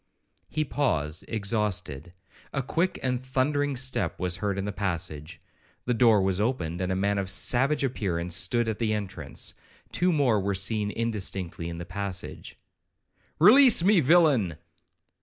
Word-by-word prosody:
He 155 0 -1
paused, 85 - -1
exhausted,—a 100 - -3
quick 170 +8 -1
and 125 -1 -1
thundering 140 +2 0
step 130 -3 -1
was 90 -1 -1
heard 100 -1 -2
in 100 - -2
the 105 - -3
passage. 85 -4 -4 0.5
The 125 - +1
door 115 -4 +4
was 95 +1 0
opened, 90 -8 -2
and 90 0 -1
a - - 0
man 100 +1 0
of 95 -1 -3
savage 130 +9 +2
appearance 90 -9 -2
stood 110 +6 +1
at 110 -2 -3
the 110 -2 0
entrance,—two 105 - -4
more 135 -9 +2
were 100 0 -1
seen 105 +2 -1
indistinctly 100 -7 -3
in 85 - -6
the 85 - -6
passage.—'Release 155 - +1
me, 200 0 +5
villain!' 140 - +3
105 Hz, 140 wpm, -26 LUFS, 95-130 Hz, 0.5 s, me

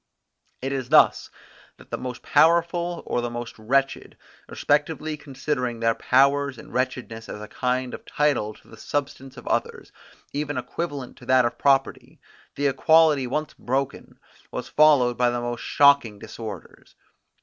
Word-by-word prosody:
It 135 - -2
is 130 -3 -3
thus 155 - +4 0.5
that - - -18
the - - -2
most 125 -1 -6
powerful 170 +1 +2
or 120 - -1
the 120 - -3
most 120 -1 -7
wretched, 135 +5 -1 0.3
respectively 150 +1 0
considering 135 -4 -3
their 115 0 +2
power 140 +4 +3
and 130 -4 -12
wretchedness 125 -3 -3
as - - -6
a 105 - -8
kind 125 +2 -2
of - - -8
title 135 -8 0
to - - -22
the 110 - -14
substance 135 0 -4
of - - -11
others, - - -2 0.4
even 145 -1 -3
equivalent 140 0 -5
to 125 - -15
that 130 -1 +4
of 120 - -3
property, 135 -1 +1 0.4
the 145 - -2
equality 150 -1 +4
once 150 +4 -3
broken 135 +2 -3 0.3
was - - -6
followed 140 -6 +4
by 125 -1 +4
the 120 0 -2
most 120 0 -4
shocking 140 -7 +4
disorders. 110 -3 -10
130 Hz, 150 wpm, -24 LUFS, 120-145 Hz, 0.5 s, thus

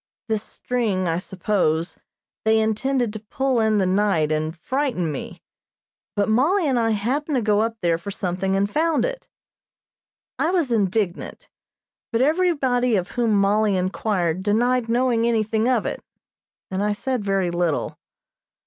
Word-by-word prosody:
This 220 -2 0
string, 215 -6 -2
I 165 +1 0
suppose, 180 -3 -1 0.4
they 220 0 +3
intended 225 +2 0
to 215 - -5
pull 260 +4 -1
in 220 -1 +2
the 195 - +2
night 185 -5 +1
and 155 +2 -1
frighten 250 - -1
me; 140 - -7 0.7
but 200 -1 +1
Mollie 310 - +2
and 260 -3 +2
I 225 -1 +1
happened 260 +8 -1
to 250 - +2
go 210 0 +3
up 225 0 -1
there 165 -1 +2
for 170 - -7
something 190 0 -2
and 195 +1 +2
found 315 +7 +1
it. - - -5 1.1
I 320 - +2
was 340 -8 +1
indignant, 200 -4 -1 0.6
but 230 +1 +2
everybody 275 -7 +2
of 185 -2 -2
whom 230 -3 +1
Mollie 205 0 +2
inquired 185 -2 -1
denied 235 +4 +1
knowing 235 -1 +2
anything 220 0 +1
of 245 -4 +1
it, - - -4 0.7
and 190 +1 -1
I 210 0 +1
said 250 +2 -2
very 195 -3 0
little. 175 -3 -1
215 Hz, 150 wpm, -23 LUFS, 190-250 Hz, 1.1 s, they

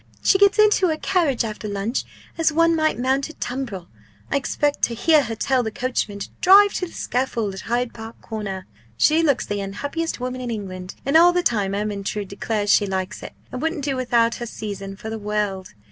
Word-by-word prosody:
She 385 - +4
gets 400 +1 +5
into 420 -3 +5
her 315 -2 0
carriage 305 -10 +1
after 215 0 -5
lunch 205 +4 -2 0.3
as 330 -1 +2
one 330 +1 +3
might 310 -1 +1
mount 265 +4 0
a - - -9
tumbril. 240 - -5 0.4
I - - +1
expect 290 +1 0
to 235 - -5
hear 310 +5 +4
her 225 0 -4
tell 260 +3 +1
the 225 - -2
coachman 230 -3 -2
to 200 - -6
drive 400 +2 +7
to 365 - -2
the - - -14
scaffold 235 -5 -2
at 190 - -7
Hyde 240 +1 -1
Park 225 0 -10
Corner.' 200 -4 -5 0.3
She 315 - +4
looks 285 -5 +2
the 205 -1 -3
unhappiest 285 +13 -3
woman 255 +1 -4
in 245 - -4
England 185 -4 -6
and 275 +3 0
all 345 +2 +8
the 355 0 +1
time 200 - +1
Ermyntrude 205 -1 -3
declares 205 0 -1
she 205 - +3
likes 190 +1 -3
it, - - -8 0.2
and 255 - -5
wouldn't 320 -3 -2
do 275 -2 0
without 235 -2 +2
her 240 - -5
season 195 -3 -6
for 220 +3 -7
the 225 - -4
world! 205 - -3
235 Hz, 205 wpm, -22 LUFS, 205-295 Hz, 0.4 s, all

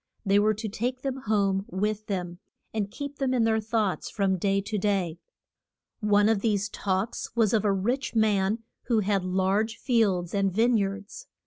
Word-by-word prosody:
They 200 +1 +4
were 215 +1 +3
to 215 +2 -4
take 245 +5 -3
them 270 -1 -2
home 195 -2 +2
with 210 +3 -2
them, 180 -3 -3 0.3
and 210 -2 -1
keep 285 +5 -7
them 260 -2 +1
in 240 - +3
their 220 0 +2
thoughts 215 -3 -1
from 195 -3 0
day 195 +2 +2
to 205 +1 -3
day. 190 -5 0 0.8
One 205 -2 +3
of 220 -2 +3
these 205 -2 0
talks 195 +2 -2
was 225 -3 +3
of 220 - +3
a 205 - +3
rich 240 +8 -1
man 215 0 +2 0.2
who 230 -3 +2
had 200 -1 +1
large 190 +4 0
fields 200 -9 +1
and 195 -1 +1
vine 230 +5 +3
yards. 200 - -3
210 Hz, 180 wpm, -27 LUFS, 195-225 Hz, 0.8 s, They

